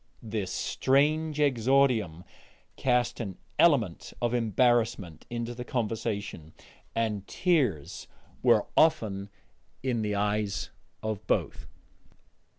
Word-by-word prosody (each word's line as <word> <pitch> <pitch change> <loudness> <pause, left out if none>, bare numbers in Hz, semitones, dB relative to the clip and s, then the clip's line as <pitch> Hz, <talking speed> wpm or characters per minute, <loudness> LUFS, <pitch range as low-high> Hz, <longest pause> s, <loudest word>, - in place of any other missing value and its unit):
This 105 -4 -3
strange 150 +7 +1
exordium 125 - +2 0.5
cast 125 -2 +1
an 100 -6 -5 0.2
element 125 - +3
of 120 0 0
embarrassment 115 - +1
into 120 0 -4
the 120 +1 -6
conversation, 105 -9 -3 0.4
and 105 -3 -1
tears 130 - 0 0.3
were - - +4
often 105 -11 +2 0.5
in 125 -4 0
the 105 -1 -1
eyes 105 -1 -1 0.3
of 110 -1 -4
both. - - -1
115 Hz, 95 wpm, -28 LUFS, 100-130 Hz, 0.5 s, were